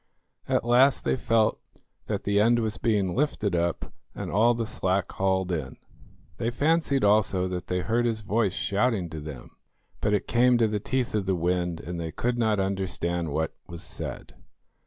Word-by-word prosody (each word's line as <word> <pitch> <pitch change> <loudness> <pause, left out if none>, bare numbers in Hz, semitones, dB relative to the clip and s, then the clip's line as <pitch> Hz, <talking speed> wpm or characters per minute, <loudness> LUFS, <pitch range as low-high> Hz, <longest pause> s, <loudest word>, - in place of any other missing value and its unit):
At - - +1
last 125 +3 +4
they - - +1
felt 115 -3 +1 0.5
that - - -2
the 100 0 +2
end 115 +3 +4
was 110 -1 -2
being 100 -6 +1
lifted 110 -8 0
up, 85 0 -2 0.2
and - - -5
all 115 +4 +4
the 115 -1 -2
slack 95 -4 -1
hauled 95 -1 0
in. 75 -6 -4 0.6
They 115 - -1
fancied 145 +2 +1
also 100 -3 +3
that 90 -1 -5
they 90 0 -1
heard 115 +6 +1
his 110 -2 -1
voice 105 -1 0
shouting 100 -4 0
to 80 - -5
them; 75 -5 -9 0.5
but 105 - 0
it - - -2
came 125 +1 +4
to 115 -1 +3
the 105 -1 -1
teeth 130 +3 -2
of 105 -3 -1
the 95 - +2
wind, 90 -1 -1
and 85 0 -6
they 80 -1 -4
could 120 +7 -1
not 110 -3 +2
understand 90 -3 -1
what 80 +2 -1
was 85 -1 -7
said. - - -6
100 Hz, 180 wpm, -26 LUFS, 90-115 Hz, 0.6 s, last